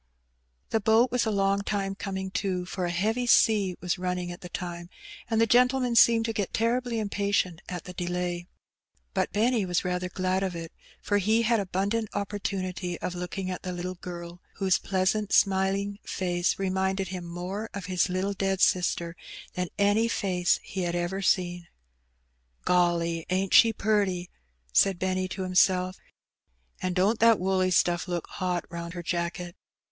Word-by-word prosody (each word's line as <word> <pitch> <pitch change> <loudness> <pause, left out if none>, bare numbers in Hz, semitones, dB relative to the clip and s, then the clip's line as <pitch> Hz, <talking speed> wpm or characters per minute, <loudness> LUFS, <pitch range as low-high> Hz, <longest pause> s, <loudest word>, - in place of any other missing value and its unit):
The 225 - +2
boat 225 +3 +4
was 245 -2 +1
a - - +2
long 200 -1 +1
time 200 -1 -2
coming 190 -1 -5
to^ 185 -2 -2
for 185 -1 -3
a - - -1
heavy 220 +8 0
sea 205 -6 +4
was 180 0 -1
running 180 -1 -2
at 175 - -9
the 180 - -8
time^ 175 -1 -6 0.4
and 225 -1 +1
the 230 - +5
gentleman 250 +1 +3
seemed 230 -1 +6
to 225 - -2
get 200 -3 -2
terribly 235 +1 0
impatient 200 -5 0
at 180 -2 -5
the 180 - -9
delay. 175 0 -3 0.7
But - - 0
Benny 225 +2 +2
was 180 -1 -1
rather. 180 0 -1
glad 185 +1 -1
of 190 -2 -2
it, 165 -1 -6 0.3
for 205 0 +2
he 220 +4 +2
had 230 0 +3
abundant 200 +3 -1
opportunity 190 -3 -3
of 180 - -3
looking, 180 +1 -4
at, 180 - -5
the 185 - -4
little 180 +1 -4
girl, 175 -1 -8
whose 190 -2 +2
pleasant, 195 +2 0
smiling 195 +1 +2
face 175 -1 -1
reminded 190 0 -1
him 185 -2 -5
more 180 +6 -5
of 200 -2 -5
his 185 +1 +1
little 185 +2 -1
dead 195 -1 -1
sister 175 -2 +1 0.4
than 180 0 -2
any 205 +3 +3
face 180 -5 +1
he 190 - -5
had 175 -1 -1
ever. 175 +3 -2
seen.. 175 -2 +1
'^ - - -21 1.0
Golly, 170 -2 +1
ain't 185 +1 0
she 225 - +8
purty!" 200 -5 0 0.4
said 195 -2 +4
Benny 185 0 -1
to 185 +1 -5
himself 185 0 +2
;•'' - - -30 0.8
and 185 -1 -1
don*t 200 +5 +3
that 230 -1 +5
woolly 185 0 +1
stuff 175 0 +2
look 175 -2 -2
hot 180 -2 -2
round 170 0 -6
her 175 - -5
jafcket! 175 +1 -3
185 Hz, 170 wpm, -27 LUFS, 180-205 Hz, 1.0 s, she